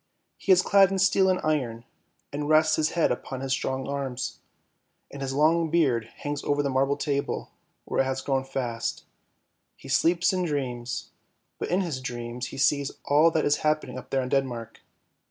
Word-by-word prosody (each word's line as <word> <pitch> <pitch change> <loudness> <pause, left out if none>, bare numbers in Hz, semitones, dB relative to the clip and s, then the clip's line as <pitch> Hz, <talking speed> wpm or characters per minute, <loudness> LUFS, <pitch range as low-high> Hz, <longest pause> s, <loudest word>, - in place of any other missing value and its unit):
He 195 - +1
is 185 -1 +6
clad 195 -2 +5
in 195 - -1
steel 190 0 +4
and 185 - +2
iron, 125 -7 -1 0.5
and 145 +1 -3
rests 155 0 +5
his 155 0 0
head 165 - +3
upon 130 +1 -4
his 135 -1 -3
strong 130 0 -1
arms, 135 -2 -4 0.7
and 140 - -8
his 135 -1 -2
long 160 +4 +3
beard 135 -9 +2
hangs 145 0 -4
over 145 0 +1
the 140 - -1
marble 135 +2 +1
table 140 -1 -2 0.3
where - - +1
it - - +1
has 130 0 -2
grown 135 -1 0
fast; 125 -4 -3 0.7
he - - -14
sleeps 175 +2 +3
and 180 -1 0
dreams, 125 -5 -3 0.5
but - - -3
in 185 +2 +2
his 155 -8 -3
dreams 120 0 -5
he - - -9
sees 140 +1 +2
all 150 +3 +5
that 160 -1 0
is 145 0 +3
happening 150 -4 -1
up - - -14
there 135 -1 0
in 125 - -4
Denmark. 125 -5 -2
140 Hz, 185 wpm, -26 LUFS, 130-155 Hz, 0.7 s, is